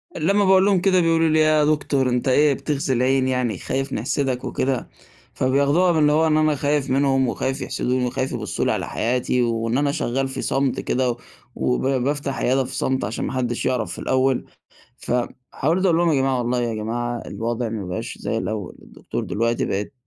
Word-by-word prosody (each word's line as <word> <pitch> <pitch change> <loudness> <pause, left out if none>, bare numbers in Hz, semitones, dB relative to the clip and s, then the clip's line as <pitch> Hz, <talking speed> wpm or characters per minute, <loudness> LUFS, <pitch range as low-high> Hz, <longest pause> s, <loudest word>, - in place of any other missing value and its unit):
لما 195 +5 +2
باقول 190 0 +5
لهم 195 -3 +3
كده 185 -1 +3
بيقولوا 165 -1 +3
لي: 155 0 +3
"إيه 155 - +5
يا 155 -1 +4
دكتور، 140 -3 +1
أنت 125 +2 -1
إيه 145 +2 +4
بتغزي 140 -2 -2
العين 130 +1 +2
يعني؟ 125 -6 -1
خايف 135 +7 -3
نحسدك 130 +2 -1
وكده؟" 130 -2 -2 0.4
فبياخدوها 140 +7 +2
من 160 - +1
اللي 150 0 +4
هو 160 +2 +3
إن 155 0 +3
أنا 155 -1 +2
خايف 145 -1 0
منهم، 135 -1 +2
وخايف 135 +3 -2
يحسدوني 125 0 -1
وخايف 130 +2 -2
يبصوا 110 -8 -3
لي - - +2
على - - -2
حياتي، 125 +2 0
وإن 115 +1 0
أنا 145 0 +1
شغّال 135 -2 -1
في 130 - -5
صمت 135 -1 0
كده، 130 0 0
و - - -4 0.4
وبافتح 135 +2 -1
عيادة 130 +2 +1
في - - -7
صمت 130 0 0
عشان 110 - -3
ما - - -4
حدش 120 -2 -2
يعرف 125 -4 0
في - - -6
الأول. 130 0 +1 0.5
ف - - -4 0.4
حاولت 170 +7 0
أقول 170 -3 +4
لهم: 170 0 +2
"يا - - +2
جماعة 135 -1 +1
والله 125 0 0
يا 115 -2 -2
جماعة 120 +2 -3
الوضع 115 +1 -3
ما 105 -4 -5
بقاش 90 - -5
زي - - -3
الأول 105 -4 -4
الدكتور - - -6
دلوقتي 115 +2 0
بقت 100 +6 -3
130 Hz, 195 wpm, -22 LUFS, 120-150 Hz, 0.5 s, باقول